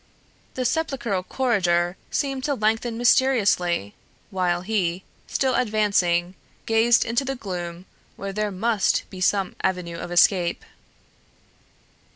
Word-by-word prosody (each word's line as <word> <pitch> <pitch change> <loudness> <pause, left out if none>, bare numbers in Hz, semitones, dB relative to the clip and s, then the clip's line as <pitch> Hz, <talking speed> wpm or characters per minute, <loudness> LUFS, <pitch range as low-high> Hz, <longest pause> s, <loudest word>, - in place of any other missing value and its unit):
The 255 - -2
sepulchral 245 - -1
corridor 180 -6 +1
seemed 270 -2 -2
to 285 -2 0
lengthen 225 +1 0
mysteriously, 205 - +2 0.4
while 180 -2 0
he, 185 -3 -1 0.2
still 265 -1 0
advancing, 200 -7 +1 0.3
gazed 225 +1 +4
into 235 +4 0
the 270 0 -3
gloom 180 -5 -6 0.3
where 195 0 -6
there 210 +1 -1
must 205 +2 +1
be 185 -2 -8
some 195 0 +1
avenue 180 -3 -2
of 175 - -6
escape. 175 0 +3
200 Hz, 115 wpm, -24 LUFS, 180-235 Hz, 0.4 s, gazed